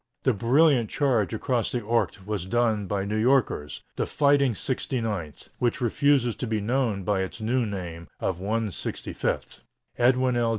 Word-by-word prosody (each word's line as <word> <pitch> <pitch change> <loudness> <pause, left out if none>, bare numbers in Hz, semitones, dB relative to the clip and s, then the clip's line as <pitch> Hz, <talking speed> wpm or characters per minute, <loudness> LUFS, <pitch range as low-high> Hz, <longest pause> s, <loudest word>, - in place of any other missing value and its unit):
The 130 - +3
brilliant 125 +2 +3
charge 125 -8 +1
across 120 +1 -1
the 125 - 0
Ourcq 105 -3 -1
was 100 -3 -3
done 110 -2 +1
by 100 0 -1
New 105 +2 -2
Yorkers 115 - +1
the - - 0
"fighting 140 -4 +3
69th," 110 - -3
which 120 -2 0
refuses 125 0 +2
to 125 - -3
be 110 -1 0
known 115 -2 0
by 95 0 +1
its 95 +4 -5
new 115 +2 0
name 85 -4 -6
of 90 -2 -2
"165th." 105 0 -3 0.4
Edwin 125 +1 +3
L. 120 -1 +2
115 Hz, 155 wpm, -26 LUFS, 100-125 Hz, 0.4 s, The